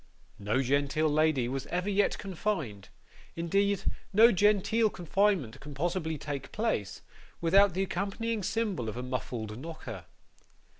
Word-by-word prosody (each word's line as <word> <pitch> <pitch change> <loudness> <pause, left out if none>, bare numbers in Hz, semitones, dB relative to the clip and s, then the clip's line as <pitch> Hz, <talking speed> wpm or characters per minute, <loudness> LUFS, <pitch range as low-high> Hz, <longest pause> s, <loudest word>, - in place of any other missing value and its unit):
No 105 +6 0
genteel 140 +4 +1
lady 150 -4 +2
was 135 +2 -4
ever 180 +2 -2
yet 205 0 +2
confined 160 - -3 0.5
indeed, 195 +4 +1 0.3
no 225 +4 +7
genteel 210 +3 +3
confinement 180 - 0
can 145 0 -10
possibly 160 +1 -1
take 140 -2 -5
place 210 - -2 0.4
without 190 +2 +4
the 190 - +1
accompanying 205 +4 -2
symbol 205 - -1
of 110 - -6
a 125 - -4
muffled 120 -3 -4
knocker. 130 - -8
170 Hz, 130 wpm, -30 LUFS, 130-200 Hz, 0.5 s, no